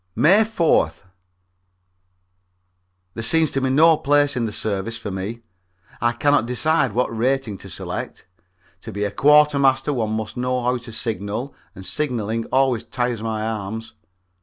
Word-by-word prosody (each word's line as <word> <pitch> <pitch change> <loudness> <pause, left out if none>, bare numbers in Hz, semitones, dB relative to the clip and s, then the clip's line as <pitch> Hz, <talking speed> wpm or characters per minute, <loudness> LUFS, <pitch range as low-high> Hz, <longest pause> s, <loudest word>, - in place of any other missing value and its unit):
May 195 +8 +5
4th. 195 - +1 2.1
There 115 - -5
seems 160 +6 +2
to 135 - -1
be 130 - 0
no 155 +4 +5
place 145 -2 +2
in 120 -2 0
the 110 - -3
service 105 +2 -3
for 110 -3 -6
me; 100 +5 -5 0.6
I 120 +1 +3
cannot 120 0 +2
decide 135 0 +1
what 120 0 0
rating 125 -1 0
to - - -10
select. - - -6 0.6
To - - -8
be 100 +1 -3
a 100 - -1
quartermaster 140 +2 +4
one 110 -4 -1
must 110 +2 -4
know 125 0 -1
how 125 +1 +1
to 120 -1 -10
signal, 110 +3 -3 0.2
and 95 - -10
signaling 115 -6 -2
always 130 -3 +1
tires 120 -3 -2
my 110 -1 -3
arms. 110 0 -5
120 Hz, 150 wpm, -22 LUFS, 110-140 Hz, 2.1 s, May